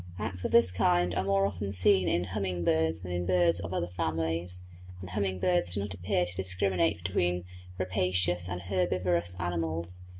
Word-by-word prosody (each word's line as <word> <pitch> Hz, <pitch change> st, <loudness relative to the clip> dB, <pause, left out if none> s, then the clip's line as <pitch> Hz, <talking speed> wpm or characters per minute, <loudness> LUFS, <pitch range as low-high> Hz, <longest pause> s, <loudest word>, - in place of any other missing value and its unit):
Acts 95 Hz, -4 st, -4 dB
of -, -, -2 dB
this 105 Hz, -6 st, +6 dB
kind 90 Hz, -1 st, +2 dB
are 90 Hz, -, 0 dB
more 100 Hz, 0 st, +2 dB
often 100 Hz, 0 st, -3 dB
seen 95 Hz, 0 st, +4 dB
in 85 Hz, -, +1 dB
humming 90 Hz, -1 st, -3 dB
birds 80 Hz, 0 st, +1 dB
than 90 Hz, -1 st, -7 dB
in 90 Hz, 0 st, -2 dB
birds 90 Hz, -2 st, +3 dB
of 85 Hz, -2 st, -6 dB
other 90 Hz, -, -1 dB
families; 80 Hz, +2 st, -2 dB, 0.4 s
and 90 Hz, -1 st, -9 dB
humming 95 Hz, -1 st, -1 dB
birds 175 Hz, -, +1 dB
do 100 Hz, -, -1 dB
not 100 Hz, -1 st, -4 dB
appear 90 Hz, -1 st, 0 dB
to 90 Hz, +1 st, -4 dB
discriminate 90 Hz, -2 st, +1 dB
between 90 Hz, 0 st, 0 dB, 0.3 s
rapacious 90 Hz, -1 st, +1 dB
and 90 Hz, -1 st, -4 dB
herbivorous 90 Hz, -1 st, 0 dB
mammals. 85 Hz, 0 st, -3 dB
90 Hz, 175 wpm, -29 LUFS, 85-95 Hz, 0.4 s, this